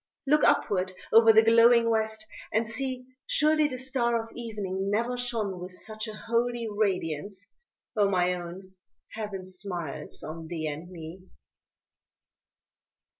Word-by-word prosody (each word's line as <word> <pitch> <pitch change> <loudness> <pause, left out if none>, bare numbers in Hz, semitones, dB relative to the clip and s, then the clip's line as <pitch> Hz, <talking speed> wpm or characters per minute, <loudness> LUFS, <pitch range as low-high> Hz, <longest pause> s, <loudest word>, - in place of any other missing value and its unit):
Look 300 +2 +3
upward 185 -1 +2 0.2
o'er 225 0 +8
the 220 0 +6
glowing 230 +1 +6
West, 220 -1 0 0.3
and 225 +1 +1
see, 255 +2 -3 0.2
Surely 305 0 +3
the 255 -3 -4
star 240 -3 +1
of 225 - -14
evening 200 -5 -3
never 235 +4 0
shone 230 -6 -2
With 180 +1 -8
such 215 +4 -5
a 215 - -7
holy 235 +1 -1
radiance 195 -2 -2 0.4
oh, 205 -2 +3
my 180 -1 +2
own, 180 +2 -8 0.4
Heaven 205 -4 -5
smiles 180 -5 -5
on 160 +1 -7
thee 160 -2 -4
and 155 +3 -5
me. 175 +1 -9
215 Hz, 130 wpm, -28 LUFS, 185-235 Hz, 0.4 s, o'er